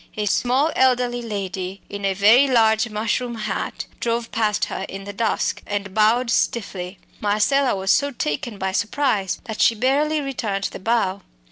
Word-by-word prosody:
A 210 - -1
small, 255 +9 +2
elderly 250 -2 +2
lady, 195 -3 -4
in 200 0 -5
a 195 -1 +1
very 220 +8 +6
large 225 -2 +3
mushroom 230 +3 -2
hat, 215 -1 -4
drove 230 0 -2
past 210 -2 +1
her - - -5
in 195 +1 -7
the 200 +1 -7
dusk 220 +2 -1
and 200 -2 -3
bowed 230 +3 +3
stiffly. 190 -6 -1 0.2
Marcella 245 +6 +2
was 190 0 0
so 285 - +3
taken 210 - -3
by 190 0 -2
surprise 205 0 0
that 220 -1 -5
she 230 - +5
barely 285 +6 +1
returned 220 -8 -2
the - - -8
bow. 200 -2 0
220 Hz, 160 wpm, -22 LUFS, 200-245 Hz, 0.2 s, very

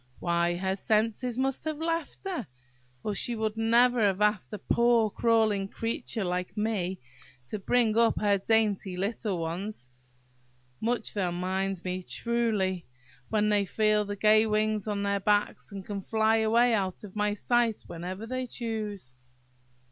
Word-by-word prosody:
Why, 170 0 +1
her 190 +1 -1
senses 225 +3 0
must 265 0 -1
have 310 -1 -2
left 330 0 -3
her, 360 - -4 0.6
or 210 - -1
she 235 +4 +1
never 225 +3 +3
would 225 - +3
have 195 -1 +1
asked 210 -2 +1
a 210 - -4
poor 235 +1 +2
crawling 220 -4 +2
creature 225 +1 -3
like 180 +1 -3
me 200 -4 -1 0.5
to 205 +11 -5
bring 225 +1 +2
up 230 0 +3
her 205 -1 +2
dainty 205 -3 +1
little 200 0 -2
ones! 170 - -5 0.9
Much 235 0 -1
they'll 185 -4 0
mind 185 +1 -2
me, 185 0 -3
truly, 210 -5 -1 0.4
when 210 -1 +2
they 205 -1 +3
feel 215 +2 +2
the 205 0 -5
gay 215 +2 +4
wings 215 -1 0
on 205 -1 -1
their 200 0 +1
backs, 205 +2 0
and 195 -1 -7
can 200 -1 -4
fly 220 +2 +2
away 230 +2 +3
out 190 -3 -1
of 205 -1 -10
my 210 0 +1
sight 235 0 +1
whenever 185 +5 -6
they 255 +2 -3
choose! 215 - -5
210 Hz, 155 wpm, -28 LUFS, 195-225 Hz, 0.9 s, gay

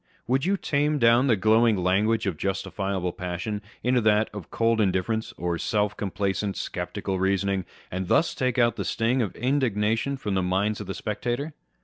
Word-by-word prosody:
Would 130 +3 +1
you 200 +1 +2
tame 150 -2 +1
down 120 +1 +4
the 120 - +4
glowing 110 +2 +4
language 100 +5 +2
of 95 -4 -1
justifiable 95 0 -2
passion 90 +3 -4 0.2
into 125 0 +3
that 110 0 +3
of 100 -6 -8
cold 115 -1 +2
indifference, 105 +3 0
of 85 -1 -2
self 105 -1 0
complacent, 100 0 -2
sceptical 95 -1 -3
reasoning, 95 0 +1 0.3
and 95 0 -3
thus 165 - +3
take 130 -1 -1
out 120 -2 +3
the - - -2
sting 120 +3 +1
of 105 -6 -2
indignation 125 -1 0
from 105 -6 -3
the 95 - +1
mind 95 +4 0
of - - -7
the 95 - -4
spectator? 120 +8 -3
105 Hz, 170 wpm, -26 LUFS, 95-120 Hz, 0.3 s, down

